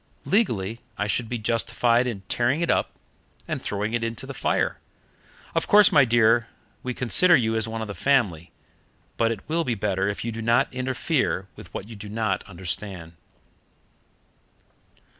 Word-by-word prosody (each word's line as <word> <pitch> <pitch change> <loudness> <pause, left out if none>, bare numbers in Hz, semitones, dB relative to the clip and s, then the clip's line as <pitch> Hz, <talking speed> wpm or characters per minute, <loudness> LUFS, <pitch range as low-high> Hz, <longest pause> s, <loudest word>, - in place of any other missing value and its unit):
Legally, 115 - 0 0.2
I 105 - -1
should 110 +2 -1
be 125 - -2
justified 115 +2 +1
in 110 -6 -4
tearing 120 - 0
it 170 - +2
up - - +1 0.6
and - - -3
throwing 105 +2 -3
it 120 -1 0
into 115 -1 -4
the - - -7
fire. - - 0 0.7
Of - - 0
course, 210 0 +7
my 145 -4 +6
dear, 115 -1 +3 0.3
we 125 -1 -4
consider 170 +8 +4
you 115 -5 +1
as 110 -1 +1
one 110 0 -4
of - - -6
the 100 - -5
family, 95 - +1 0.7
but 115 - +2
it 110 -4 -5
will 165 +2 0
be 125 -6 -1
better 100 -1 0
if 105 - -4
you 115 - -2
do 115 +1 -6
not 120 +5 +2
interfere 130 - -1
with - - -13
what 100 - -6
you 115 - -9
do 105 0 -9
not 110 -2 -1
understand." 90 -1 -5
115 Hz, 170 wpm, -25 LUFS, 100-125 Hz, 0.7 s, course